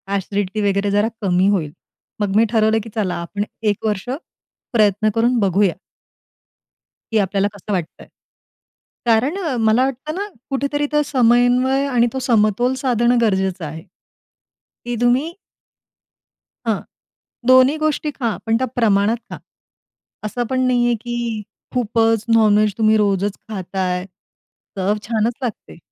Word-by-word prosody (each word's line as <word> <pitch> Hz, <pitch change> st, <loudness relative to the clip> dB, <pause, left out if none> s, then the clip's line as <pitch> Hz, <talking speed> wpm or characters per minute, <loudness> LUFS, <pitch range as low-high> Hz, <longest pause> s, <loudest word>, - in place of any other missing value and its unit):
Acidity 200 Hz, +1 st, -2 dB
वगैरे 200 Hz, +1 st, 0 dB
जरा 205 Hz, +2 st, +2 dB
कमी 185 Hz, -1 st, +2 dB
होईल. 165 Hz, -8 st, 0 dB, 0.5 s
मग 205 Hz, -1 st, -1 dB
मी 225 Hz, +1 st, +5 dB
ठरवलं, 220 Hz, -1 st, +3 dB
की 225 Hz, -, -9 dB
चला 195 Hz, -5 st, -1 dB
आपण 200 Hz, +4 st, -3 dB, 0.2 s
1 210 Hz, 0 st, -1 dB
वर्ष 210 Hz, +2 st, -2 dB, 0.6 s
प्रयत्न 215 Hz, -1 st, +3 dB
करून 240 Hz, +2 st, +2 dB
बघूया. 195 Hz, -2 st, +2 dB, 1.4 s
की 220 Hz, -, +3 dB
आपल्याला 195 Hz, 0 st, +1 dB
कसं 205 Hz, +1 st, -8 dB
वाटत 175 Hz, -4 st, -4 dB
आहे? -, -, -14 dB, 1.0 s
कारण 240 Hz, -, +2 dB, 0.3 s
मला 220 Hz, +3 st, +4 dB
वाटतं 270 Hz, +5 st, -4 dB
ना 405 Hz, +2 st, -3 dB, 0.2 s
कुठेतरी 280 Hz, +2 st, -1 dB
तो 295 Hz, 0 st, +3 dB
समन्वय 250 Hz, +1 st, +3 dB
आणि 240 Hz, -3 st, +2 dB
तो 265 Hz, -, -2 dB
समतोल 240 Hz, 0 st, +2 dB
साधणं 245 Hz, -2 st, +2 dB
गरजेचं 190 Hz, -5 st, 0 dB
आहे. 160 Hz, +2 st, -7 dB, 1.0 s
की 240 Hz, 0 st, -2 dB
तुम्ही 265 Hz, +8 st, +2 dB, 1.3 s
हां. 220 Hz, -3 st, +1 dB, 0.7 s
दोन्ही 260 Hz, +4 st, +6 dB
गोष्टी 310 Hz, 0 st, -1 dB
खा 235 Hz, -6 st, -2 dB
पण 225 Hz, 0 st, +2 dB
त्या 260 Hz, -, -1 dB
प्रमाणात 215 Hz, -1 st, +2 dB
खा. -, -, -5 dB, 0.9 s
असं 240 Hz, +3 st, -2 dB
पण 260 Hz, 0 st, 0 dB
नाही 245 Hz, -1 st, +2 dB
आहे, 240 Hz, -1 st, +2 dB
की 235 Hz, -1 st, -4 dB, 0.3 s
खूपच 225 Hz, -2 st, +1 dB
नॉन 215 Hz, -2 st, +5 dB
व्हेज 210 Hz, -2 st, +2 dB
तुम्ही 220 Hz, 0 st, +4 dB
रोजच 200 Hz, -1 st, 0 dB
खात 195 Hz, -3 st, -7 dB
आहे. 180 Hz, -1 st, -1 dB, 0.7 s
चव 195 Hz, +2 st, +1 dB
छानच 225 Hz, +1 st, 0 dB
लागते. 235 Hz, -8 st, -6 dB
220 Hz, 135 wpm, -19 LUFS, 200-245 Hz, 1.4 s, दोन्ही